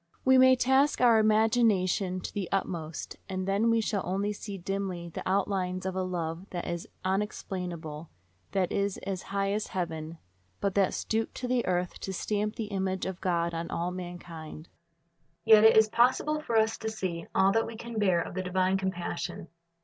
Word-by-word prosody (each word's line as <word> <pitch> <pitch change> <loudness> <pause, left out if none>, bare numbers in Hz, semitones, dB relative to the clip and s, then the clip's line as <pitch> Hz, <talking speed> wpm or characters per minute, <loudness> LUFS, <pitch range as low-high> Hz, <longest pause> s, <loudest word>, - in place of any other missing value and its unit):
We 260 0 +6
may 260 0 +7
task 265 +3 +3
our 235 -3 +6
imagination 215 -4 +2
to - - -6
the 195 -4 -3
utmost, 170 -5 -3
and 185 0 -3
then 200 +4 +2
we 230 0 +3
shall 210 -2 -1
only 195 +4 -1
see 205 -1 -7
dimly 185 -2 -3
the - - -6
outlines 185 -1 0
of 190 -1 -2
a 190 - 0
love 175 0 -4
that 175 -1 -4
is 170 -1 -4 0.2
unexplainable, 180 -5 -3 0.4
that 190 -2 +1
is 200 -1 0
as 190 -2 -3
high 195 0 0
as 210 +1 -1
heaven, 165 -2 -3 0.4
but 200 -1 0
that 195 -2 +2
stooped 220 0 -2
to 250 - -4
the 250 -1 +1
earth 180 -1 -1
to 190 - -5
stamp 210 +3 -1
the 225 - -3
image 190 -1 -1
of 190 -1 -5
God 170 -2 0
on 165 0 -4
all 175 +1 -2
mankind. 175 -3 -8 0.8
Yet 220 -1 +8
it 220 - +7
is 220 0 +7
possible 260 +7 +2
for 235 -6 0
us 220 0 +2
to 220 - -3
see 185 -6 -4
all 195 +1 +5
that 225 +2 +1
we 230 - -7
can 235 0 -5
bear 185 -5 +3
of - - -6
the 185 - -2
divine 185 +1 +1
compassion. 175 -3 -4
190 Hz, 185 wpm, -29 LUFS, 180-215 Hz, 0.8 s, Yet